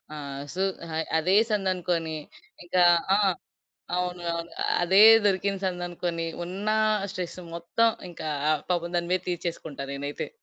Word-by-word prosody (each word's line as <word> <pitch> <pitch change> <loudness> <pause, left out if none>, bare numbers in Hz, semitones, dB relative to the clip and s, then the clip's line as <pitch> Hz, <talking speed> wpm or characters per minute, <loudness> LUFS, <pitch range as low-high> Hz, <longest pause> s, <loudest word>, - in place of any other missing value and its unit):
ఆహ్, 140 -1 -6
సు 190 - 0 0.3
హాయ్ 160 0 -1
అదే 185 +5 +3
సందనుకోని, 180 -5 -1 0.5
ఇంక 175 - -7 0.4
ఆ! - - +2 0.8
అవును. 180 -1 -2
అవును. 170 0 -5 0.3
అదే 190 +4 +6 0.2
దొరికిన 195 0 +1
సందనుకొని, 175 -2 -3 0.2
ఉన్నా 205 +4 -1 0.4
స్ట్రెస్ 180 -2 -5 0.2
మొత్తం 200 +7 +2 0.2
ఇంకా, 160 -2 -7 0.4
పాపం 175 0 -1
దాని 170 0 -2
మీద 185 - +1
తీర్చేసుకుంటా 165 -5 -4
నేనైతే. 145 +1 -4
175 Hz, 120 wpm, -26 LUFS, 165-185 Hz, 0.8 s, అదే